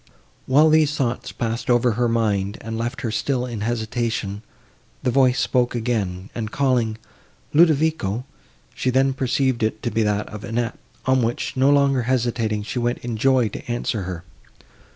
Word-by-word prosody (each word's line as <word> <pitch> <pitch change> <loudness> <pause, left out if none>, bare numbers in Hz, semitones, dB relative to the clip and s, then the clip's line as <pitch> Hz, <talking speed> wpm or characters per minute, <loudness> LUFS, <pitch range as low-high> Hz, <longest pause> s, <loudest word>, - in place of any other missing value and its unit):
While 150 +4 +5
these 155 -1 +4
thoughts 125 -5 -2
passed 115 +1 -3
over 120 0 +4
her 120 +2 +1
mind, 105 -3 0
and 115 0 -5
left 120 +5 -3
her 115 -4 -2
still 125 +3 -1
in 115 -4 -5
hesitation, 110 -2 -2 0.6
the 125 - +1
voice 130 -1 +3
spoke 125 -1 +1
again, 105 -6 -2
and, 110 -2 -4
calling 125 -5 +1 0.6
"Ludovico," 155 - +3 0.5
she 130 0 -1
then 135 +1 +3
perceived 130 -2 0
it 110 0 -1
to 120 - -1
be 115 - +1
that 105 -1 0
of 105 -1 -8
Annette; 115 0 -2 0.3
on 130 0 +3
which, 115 +1 -2
no 135 +1 +4
longer 140 -2 +4
hesitating, 115 -3 0
she 125 +4 -3
went 120 +1 0
in 120 -2 -2
joy 130 +1 +3
to 105 - -9
answer 120 -3 -1
her. 90 -2 -5
120 Hz, 165 wpm, -22 LUFS, 110-130 Hz, 0.6 s, While